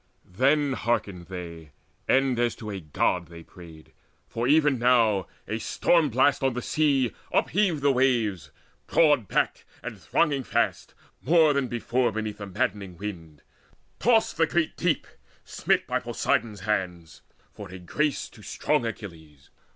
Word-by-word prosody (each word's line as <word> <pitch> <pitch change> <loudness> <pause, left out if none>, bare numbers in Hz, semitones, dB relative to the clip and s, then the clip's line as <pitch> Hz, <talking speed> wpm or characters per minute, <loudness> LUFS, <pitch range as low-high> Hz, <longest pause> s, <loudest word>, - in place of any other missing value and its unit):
Then 140 +8 +2
hearkened 105 -7 -2
they, 85 -5 -8 0.3
and 135 -2 +2
as 120 -1 +1
to 110 -2 -7
a 100 - -5
God 85 +2 -1
they 85 0 -12
prayed; 80 -3 -14 0.4
For 115 +2 -2
even 145 -2 +4
now 115 -6 +3 0.2
a 110 - -3
storm 160 +7 +2
blast 130 +4 +2
on 135 -2 +1
the 125 - -2
sea 140 -6 +1 0.2
Upheaved 180 -7 +1
the 140 - +5
waves, 115 - +1 0.4
broad 145 - +3
backed - - 0 0.2
and - - -7
thronging 145 -5 +1
fast - - -1 0.3
More 160 -2 +4
than 140 -2 0
before 120 +1 0
beneath 110 -1 -4
the 100 - -6
madding 100 -3 -3
wind. 85 -7 -8 0.6
Tossed 225 -8 +2
the 165 0 +3
great 170 -1 0
deep, 170 -4 0 0.4
smit - - 0
by - - -1
Poseidon's 110 -4 -1
hands 90 -6 -3 0.3
For 100 -3 -9
a 95 - -9
grace 140 - -2
to - - -16
strong 115 - -1
Achilles. 80 -10 -10
115 Hz, 145 wpm, -26 LUFS, 90-140 Hz, 0.6 s, the